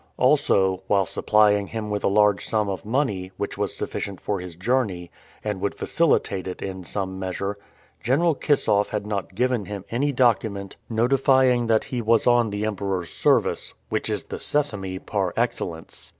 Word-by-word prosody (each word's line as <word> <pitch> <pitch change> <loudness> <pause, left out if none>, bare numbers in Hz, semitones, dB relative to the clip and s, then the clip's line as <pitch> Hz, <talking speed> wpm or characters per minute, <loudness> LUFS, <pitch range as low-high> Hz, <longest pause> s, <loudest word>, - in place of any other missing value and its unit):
Also, 95 -1 +3
while 100 -2 +3
supplying 105 +1 +3
him 110 -1 -5
with 105 -1 -2
a - - +3
large 105 0 +3
sum 105 -2 0
of 95 - -4
money, 110 -8 -1
which - - -3
was - - -2
sufficient 100 -3 -4
for 100 -2 -2
his 90 -2 -8
journey, 95 -3 -1 0.3
and 105 -3 -3
would 100 - -1
facilitate 140 - +1
it 90 - -5
in 95 -1 -5
some 95 +1 -3
measure, 95 +2 -3 0.4
General 150 +8 +2
Kissoff 135 -8 +1
had 105 -1 -3
not 100 -3 -4
given 125 -2 0
him 100 -1 -7
any 140 +5 +1
document 110 -6 +1
notifying 125 +1 +3
that 110 -1 +3
he 125 -2 -4
was 115 0 +3
on 120 -2 +4
the 105 +1 -2
Emperor's 95 -4 -2
service, - - +1
which - - -1
is - - -2
the - - -7
Sesame 105 -11 0
par 95 -2 -2
excellence. 90 -8 -3
105 Hz, 165 wpm, -24 LUFS, 95-120 Hz, 0.4 s, on